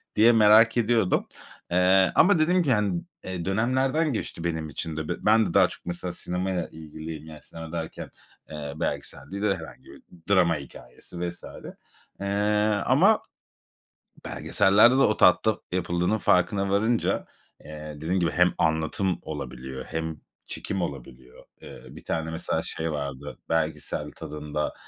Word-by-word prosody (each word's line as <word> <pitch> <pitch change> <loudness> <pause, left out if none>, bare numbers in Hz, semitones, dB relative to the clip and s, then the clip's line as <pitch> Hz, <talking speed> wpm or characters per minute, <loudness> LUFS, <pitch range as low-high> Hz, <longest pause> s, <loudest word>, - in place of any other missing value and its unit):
diye 110 +3 +6
merak 110 +1 +6
ediyordum, 110 -4 +2 0.4
eee, 90 +1 +4
ama 180 -1 +5
dediğim 175 +3 +3
gibi, 135 -4 +2
hani, 100 -5 0 0.4
dönemlerden 130 +9 +1
geçti 85 -5 -4
benim 80 -2 -2
için 80 +2 -4
de. 80 -1 -4
Ben 110 +1 +5
de - - -4
daha 95 -2 +6
çok, - - -11
mesela, 90 0 -4
sinemaya 90 0 -3
ilgiliyim. 80 0 -9
Yani 80 -1 -11
sinema 80 -1 -10
derken, 80 -1 -5 0.4
eee, 75 -2 -6
belgesel - - -4
değil 100 +1 -4
de 100 -2 +2
herhangi 80 -3 -11
bir - - -15 0.3
drama 85 -3 +4
hikâyesi 70 +6 -8
vs. 85 - -13 0.8
eee, 100 - -5 0.6
ama 185 - +4 1.0
belgesellerde 105 +6 +4
de - - +3
o 110 -6 +3
tatta 110 +4 +4
yapıldığının 90 +3 0
farkına 95 0 +2
varınca, 110 +4 +1 0.4
eee, 75 0 -8
dediğim 85 +5 -1
gibi 85 -2 +1
hem 90 0 +3
anlatım 80 +4 0
olabiliyor 65 -3 -7
hem 80 -1 -4 0.3
çekim 95 -3 -4
olabiliyor. 65 -4 -8 0.2
Eee, - - -11
bir - - -12
tane, 80 0 -2
mesela, 80 - -2
şey 80 0 -4
vardı 70 -1 -5
belgesel 75 -2 -2
tadında, 75 0 -4
90 Hz, 140 wpm, -26 LUFS, 80-105 Hz, 1.0 s, diye